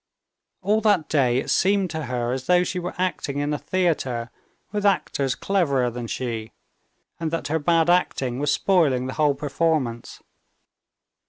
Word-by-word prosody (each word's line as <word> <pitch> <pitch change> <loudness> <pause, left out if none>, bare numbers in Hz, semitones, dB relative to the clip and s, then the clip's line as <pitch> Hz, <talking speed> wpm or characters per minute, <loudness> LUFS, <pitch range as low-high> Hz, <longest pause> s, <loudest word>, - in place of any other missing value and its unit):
All 210 +3 +2
that 205 -7 +2
day 130 -5 +2
it 130 - -1
seemed 195 -2 +2
to 160 -2 -4
her 120 -1 -2
as 130 0 -4
though 180 0 +4
she 180 - -3
were 180 0 -5
acting 180 -6 -2
in 145 +1 -1
a 150 - -2
theater 135 -10 -1 0.4
with 205 0 -2
actors 140 -9 +1
cleverer 140 -11 +1
than 120 0 -6
she, 115 -3 -4 0.7
and 165 -1 -2
that 165 -1 -3
her 160 +2 +1
bad 165 +2 +2
acting 135 -8 +1
was 145 0 +1
spoiling 145 -9 +2
the 130 - -4
whole 150 -2 +2
performance. 140 -4 -2
150 Hz, 160 wpm, -23 LUFS, 130-180 Hz, 0.7 s, though